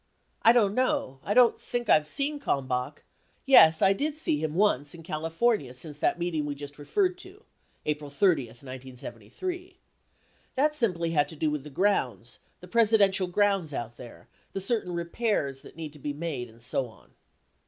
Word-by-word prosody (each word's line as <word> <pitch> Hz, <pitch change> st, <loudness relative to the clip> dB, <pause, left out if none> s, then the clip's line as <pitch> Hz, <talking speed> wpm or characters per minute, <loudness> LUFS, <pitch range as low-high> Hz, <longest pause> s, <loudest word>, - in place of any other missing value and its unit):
I 230 Hz, -, +7 dB
don't 215 Hz, -5 st, +3 dB
know 210 Hz, -, 0 dB
I 205 Hz, -, -1 dB
don't 245 Hz, -2 st, +5 dB
think 240 Hz, -1 st, -3 dB
I've 155 Hz, -5 st, +4 dB
seen 285 Hz, -, -2 dB
Kalmbach 130 Hz, -, -2 dB, 0.2 s
— -, -, -40 dB
yes, 160 Hz, -, +7 dB
I 195 Hz, -, +6 dB
did 295 Hz, +8 st, -2 dB
see 155 Hz, -, 0 dB
him 155 Hz, 0 st, -3 dB
once 170 Hz, -7 st, +2 dB
in 165 Hz, -, -12 dB
California 165 Hz, -, -1 dB
since 150 Hz, +3 st, -6 dB
that -, -, +1 dB
meeting 170 Hz, -3 st, -1 dB
we 145 Hz, -, -3 dB
just 145 Hz, 0 st, -10 dB
referred 365 Hz, -, 0 dB
to 390 Hz, +4 st, -9 dB, 0.4 s
[April 150 Hz, -1 st, -2 dB
30, 145 Hz, -4 st, +2 dB
1973]. 130 Hz, -, -8 dB, 0.8 s
That 300 Hz, +3 st, +2 dB
simply 180 Hz, -, 0 dB
had 145 Hz, -3 st, +2 dB
to -, -, -9 dB
do 155 Hz, 0 st, 0 dB
with 150 Hz, -2 st, -3 dB
the 150 Hz, -, -9 dB
grounds, 130 Hz, -, -1 dB, 0.2 s
the 180 Hz, -, -11 dB
Presidential 205 Hz, -3 st, +3 dB
grounds 190 Hz, -5 st, +1 dB
out 120 Hz, 0 st, -5 dB
there, 120 Hz, -2 st, -12 dB, 0.3 s
the -, -, -2 dB
certain 195 Hz, -2 st, -1 dB
repairs 170 Hz, -, -1 dB
that -, -, -14 dB
need 155 Hz, -3 st, -6 dB
to 150 Hz, -, -12 dB
be 145 Hz, +1 st, -4 dB
made 145 Hz, -6 st, -4 dB
and 115 Hz, +1 st, -16 dB
so 125 Hz, +1 st, -1 dB
on. 110 Hz, -, -19 dB
165 Hz, 175 wpm, -27 LUFS, 145-215 Hz, 0.8 s, I